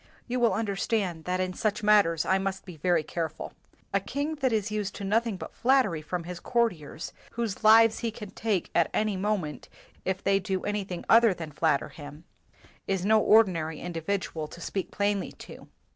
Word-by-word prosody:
You 250 +1 -1
will 235 -5 +3
understand 200 -5 -1
that 180 0 -1
in 185 0 -1
such 210 +2 -1
matters 200 -6 +4
I 190 0 +2
must 195 0 -3
be 180 - -9
very 165 +1 +1
careful. 160 0 -4 0.4
A 195 - +3
king 285 +10 -3
that 265 -3 +1
is 215 -1 0
used 210 -2 -3
to - - -6
nothing 220 +1 +1
but - - -8
flattery 255 - +2
from 175 +2 -4
his 175 +1 -7
court 235 +2 +1
iers, 155 0 -8 0.2
whose 230 -4 -3
lives 225 +1 +7
he 230 - -1
can 210 -2 -9
take 210 -3 -1
at 170 - +3
any 215 -2 +1
moment 185 -8 -2 0.3
if 190 0 -2
they 195 0 +3
do 190 -1 -2
anything 200 -4 -3
other 230 -3 +6
than 160 -3 -7
flatter 150 -1 +1
him, 145 +1 -11 0.6
is 190 -1 -1
no 220 +1 +5
ordinary 180 -9 +3
individual 170 -2 -3
to 170 - -12
speak 190 +2 -3
plainly 200 -1 -1
to. - - -12
195 Hz, 185 wpm, -28 LUFS, 170-215 Hz, 0.6 s, lives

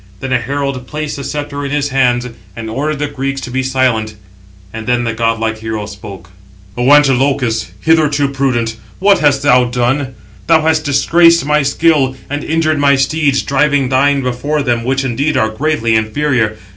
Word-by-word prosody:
Then 130 -1 -3
a 125 - +2
herald 135 0 -4
placed 150 0 -5
the 140 - -6
sceptre 145 0 -5
in 140 - -3
his 145 0 -1
hands, 125 -2 +1 0.3
and 110 -1 -6
ordered 150 +5 -2
the 150 - -2
Greeks 135 -1 -4
to 125 - -7
be 130 +1 -1
silent; 130 -5 0 0.6
and 110 0 -7
then 120 0 +1
the 115 -1 -2
godlike 115 -1 -1
hero 110 -1 -4
spoke: 100 -2 -11 0.4
"O 125 +3 +1
Antilochus, 135 -5 +2
hitherto 150 -3 +2
prudent, 125 -5 -1 0.2
what 200 +1 +3
hast 140 -2 +2
thou 125 -3 +4
done? 125 +2 -1 0.3
Thou 160 -1 +4
hast 160 0 +1
disgraced 165 +4 +3
my 150 +1 +2
skill, 140 -1 +1 0.2
and 145 0 -3
injured 155 -1 0
my 140 -1 +4
steeds, 140 0 +1
driving 140 -1 +1
thine 140 +1 +2
before 140 +4 -2
them, 120 -3 0
which 135 +2 -1
indeed 135 +4 -1
are 110 - +1
greatly 115 -1 -1
inferior. 110 -1 0
135 Hz, 170 wpm, -14 LUFS, 120-145 Hz, 0.6 s, thou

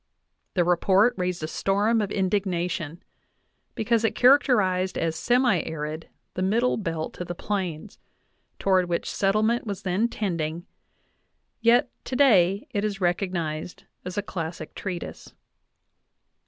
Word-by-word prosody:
The 180 - +4
Report 190 +6 +3
raised 180 -3 -2
a - - -1
storm 205 +6 +1
of 205 - -2
indignation,"' 180 -4 -1 0.7
because 230 +1 +1
it 225 - +1
characterized 210 -9 +3
as 165 -1 -1
semi 245 -4 +2
arid 155 0 -5 0.2
the 185 - -4
middle 225 +7 +2
belt 165 -5 -4
of 180 - -4
the 175 - -4
Plains, 190 -1 -4 0.6
toward 185 -2 +2
which 170 - -1
settlement 215 +4 +1
was 200 -3 -4
then 195 +5 +1
tending, 170 -6 -3 0.9
yet 235 +1 +4
today 205 -8 +3
it 205 -4 -1
is 205 -2 -2
recognized 175 -3 -2 0.2
as 180 +1 -6
a 205 - 0
classic 170 -3 -6
treatise. 180 -4 -6
190 Hz, 125 wpm, -25 LUFS, 175-215 Hz, 0.9 s, The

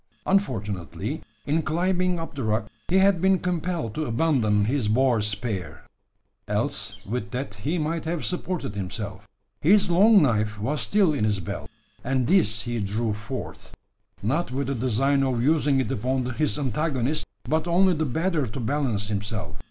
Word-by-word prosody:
Unfortunately, 105 - -1 0.2
in 155 +3 +1
climbing 180 +2 +1
up 165 - -6
the 140 - -5
rock, 110 -1 0 0.2
he 180 - 0
had 190 -2 +4
been 190 0 +4
compelled 175 -8 -2
to 155 - -2
abandon 115 -6 +2
his 125 -1 0
boar 120 +1 +3
spear: 100 -5 -3 0.6
else - - -2
with 105 -1 -3
that 125 -1 -4
he 140 - -2
might 160 +1 -2
have 165 0 -2
supported 180 - -2
himself. 100 0 -5 0.3
His 195 +3 +5
long 205 +5 +7
knife 110 -5 +1
was 140 +8 -1
still 195 -6 +3
in 140 - -1
his 105 -2 +1
belt; 95 - -6 0.3
and 130 0 +1
this 105 - +3
he 120 -1 -2
drew 105 +2 -1
forth 110 +5 -7 0.5
not 150 +10 0
with 135 +2 -1
the 135 - -1
design 130 +3 +1
of 125 -3 0
using 145 -1 +3
it 130 - -1
upon 130 +1 0
his 150 +2 0
antagonist, 140 +1 -1 0.2
but 155 +6 0
only 180 +2 +4
the 160 -1 0
better 160 +1 0
to 110 +5 -6
balance 115 -4 0
himself. 105 0 -3
135 Hz, 160 wpm, -25 LUFS, 110-165 Hz, 0.6 s, long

